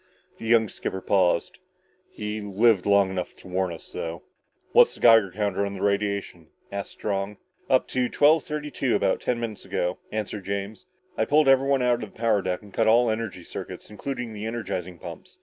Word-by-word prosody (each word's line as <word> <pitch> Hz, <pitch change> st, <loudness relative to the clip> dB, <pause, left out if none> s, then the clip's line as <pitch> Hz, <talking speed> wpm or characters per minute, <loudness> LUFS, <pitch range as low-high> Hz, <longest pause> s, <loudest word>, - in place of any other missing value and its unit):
The 115 Hz, -, -6 dB
young 115 Hz, -1 st, +4 dB
skipper 95 Hz, -, -4 dB
paused. 95 Hz, -3 st, +1 dB, 0.5 s
"He 105 Hz, 0 st, -5 dB
lived 105 Hz, 0 st, +2 dB
long 100 Hz, -1 st, +4 dB
enough 90 Hz, -2 st, -4 dB
to -, -, -15 dB
warn 95 Hz, 0 st, -1 dB
us, 85 Hz, -, -9 dB
though." 85 Hz, 0 st, -5 dB, 0.5 s
"What's -, -, +6 dB
the -, -, -14 dB
Geiger 115 Hz, -4 st, +6 dB
count 100 Hz, 0 st, -2 dB
on 100 Hz, 0 st, -1 dB
the 95 Hz, -, -5 dB
radiation?" 100 Hz, -4 st, -1 dB, 0.2 s
asked 100 Hz, 0 st, -4 dB
Strong. 100 Hz, 0 st, -3 dB, 0.3 s
"Up 130 Hz, -1 st, +3 dB
to 125 Hz, -1 st, 0 dB
twelve 150 Hz, +1 st, +4 dB
thirty 150 Hz, -1 st, -5 dB
two 130 Hz, -3 st, 0 dB
about -, -, +1 dB
ten 120 Hz, -1 st, -1 dB
minutes 115 Hz, -3 st, -5 dB
ago," 90 Hz, +1 st, -2 dB
answered 105 Hz, -2 st, -4 dB
James. 100 Hz, -, -4 dB, 0.3 s
"I -, -, +3 dB
pulled 150 Hz, 0 st, +4 dB
everybody 135 Hz, 0 st, +4 dB
out 120 Hz, -1 st, +2 dB
of 110 Hz, -, -7 dB
the -, -, -19 dB
power 110 Hz, -3 st, +2 dB
deck 90 Hz, +1 st, -3 dB
and 100 Hz, -2 st, -15 dB
cut 115 Hz, -, +2 dB
all 115 Hz, +1 st, +5 dB
energy 110 Hz, -5 st, -4 dB
circuits, -, -, -8 dB
including 125 Hz, +1 st, -5 dB
the 105 Hz, +1 st, -5 dB
energizing 90 Hz, -6 st, -4 dB
pumps. -, -, -10 dB
105 Hz, 190 wpm, -25 LUFS, 95-120 Hz, 0.5 s, What's